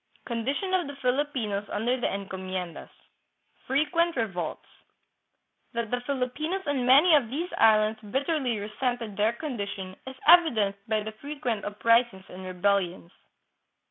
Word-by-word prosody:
Condition 270 - -2
of 365 -5 +2
t7ie 285 0 -8
Filipinos 250 -6 -1
under 225 +4 0
the - - +2
Encomiendas. 190 -3 -5 0.8
Frequent 310 +5 +1
Revolts. 195 - -3 1.1
That 235 -2 -3
the 245 0 0
Filipinos 285 +8 -2
on 270 -4 0
many 290 +7 +7
of 275 -7 +4
these 325 +8 -3
islands 215 0 +4
bitterly 270 -2 0
resented 215 +1 -3
their 210 +3 +2
condition 200 -9 -5
is 265 - -7
evidenced 235 - +5
by 215 -1 +1
the 220 - -5
frequent 265 -7 -3
uprisings 220 -1 +2
and 185 +1 -9
rebellions. 185 -2 0
235 Hz, 125 wpm, -27 LUFS, 200-280 Hz, 1.1 s, many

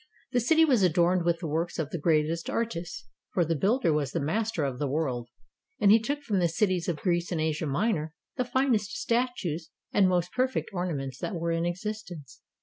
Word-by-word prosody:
The 245 - +2
city 320 +7 +4
was 255 -8 +3
adorned 175 0 +3
with 170 -1 +1
the 165 - -3
works 165 +3 -2
of 155 -2 -2
the 170 - -3
greatest 160 +1 +1
artists, 225 -2 -3 0.3
for 175 - +3
the 165 +1 0
builder 190 - +2
was 145 -3 -1
the - - 0
master 175 +4 -1
of 130 -3 -2
the 145 - 0
world, 130 -5 -2 0.5
and 200 -1 +5
he 225 - +7
took 285 +6 -3
from 210 -8 0
the 175 - +3
cities 180 0 0
of 170 - -1
Greece 175 0 0
and 170 - -1
Asia 155 0 -1
Minor 160 0 0 0.2
the 255 - 0
finest 250 -1 0
statues 230 - -1 0.2
and 195 -2 +5
most 180 -1 0
per 255 +1 +2
fect 260 - -4
ornaments 145 -8 -3
that 210 - -3
were 170 0 -1
in 165 +1 0
existence. 175 - -6
175 Hz, 205 wpm, -28 LUFS, 160-215 Hz, 0.5 s, he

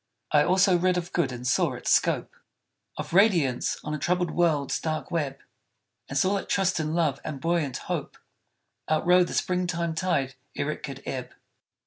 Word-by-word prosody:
I 150 -1 +5
also 185 +1 +4
read 180 0 +2
of 175 -1 -4
good 160 -7 +1
and 125 0 -7
saw 125 - +2
its - - -2
scope - - +2 0.6
Of - - -6
radiance 175 - +3
on 150 - -4
a 150 - -3
troubled 180 +3 0
world's 155 -5 +1
dark 155 -1 -3
web; 150 -5 -1 0.7
And 135 - -2
saw 190 +7 +2
that - - -6
trust 190 -3 +1
and 155 0 -1
love 155 -5 +1
and 150 -3 -5
buoyant 165 -3 0
hope - - -4 0.7
Outrode 175 +3 +4
the - - -5
spring 180 0 0
time 170 -1 -1
tide 155 -6 0 0.2
ere 145 - -1
it - - -7
could 135 -1 -7
ebb. 130 -2 -5
165 Hz, 175 wpm, -26 LUFS, 140-180 Hz, 0.7 s, I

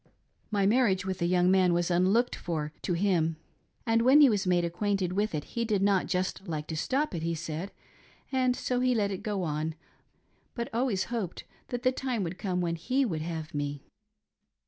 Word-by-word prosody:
My 205 -3 +1
marriage 200 -4 +3
with 190 -2 -3
a 170 - +2
young 180 0 +3
man 185 -2 +4
was 175 +1 +1
unlooked 195 +8 +3
for 155 -3 -4
to 180 - -1
him, 170 -3 +1 0.5
and 230 0 +3
when 260 +5 +6
he 285 -5 +7
was 200 -2 0
made 175 -1 +3
acquainted 185 +1 -1
with 205 -2 0
it 150 - -2
he 235 - -3
did 210 -4 +1
not 200 -2 +2
just 185 +1 -2
like 155 -3 -3
to 160 - -3
stop 270 - 0
it, 165 - -3
he 165 +1 -1
said, 165 +3 -5 0.6
and 255 -2 +2
so 250 -1 -1
he 250 0 +2
let 205 -3 +1
it 190 - -4
go 205 -3 -2
on, 155 0 -2 0.8
but 235 -1 -3
always 230 -5 +1
hoped 205 -7 -3 0.2
that 245 0 -4
the 255 - +4
time 255 -5 -2
would 175 +1 -5
come 180 -2 -1
when 170 -1 -1
he 255 +11 +1
would 165 -9 -2
have 160 -1 -5
me. 145 -1 -3
190 Hz, 200 wpm, -29 LUFS, 170-230 Hz, 0.8 s, he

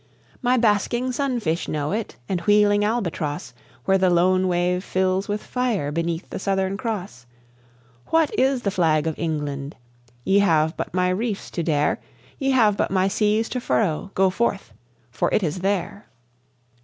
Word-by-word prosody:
"My 250 0 +2
basking 240 +3 +1
sunfish 240 - -1
know 150 -1 -2
it, 215 - -3
and 180 -2 -1
wheeling 205 0 +4
albatross, 170 - -2 0.3
Where 195 0 +3
the 185 0 +3
lone 185 +2 +3
wave 180 +1 0
fills 185 +1 0
with 205 +1 -3
fire 235 - -1
beneath 165 +2 -2
the - - -4
Southern 190 0 0
Cross. 195 - -5 0.8
What 325 -2 +2
is 265 -1 +2
the 200 - 0
Flag 160 -5 +2
of 160 - 0
England? 145 -3 -3 0.5
Ye 195 +7 +3
have 160 -4 +2
but - - -4
my 180 0 +2
reefs 205 +2 -2
to 170 - -2
dare, 150 -3 +1 0.4
Ye 270 -2 0
have 225 -6 +4
but - - 0
my 190 0 +2
seas 210 +3 +1
to 250 - -3
furrow. 195 -5 0
Go 190 0 +3
forth, 195 - -1 0.4
for 115 - 0
it 210 - +2
is 160 +2 -2
there!" 195 +1 -2
190 Hz, 160 wpm, -23 LUFS, 170-215 Hz, 0.8 s, wheeling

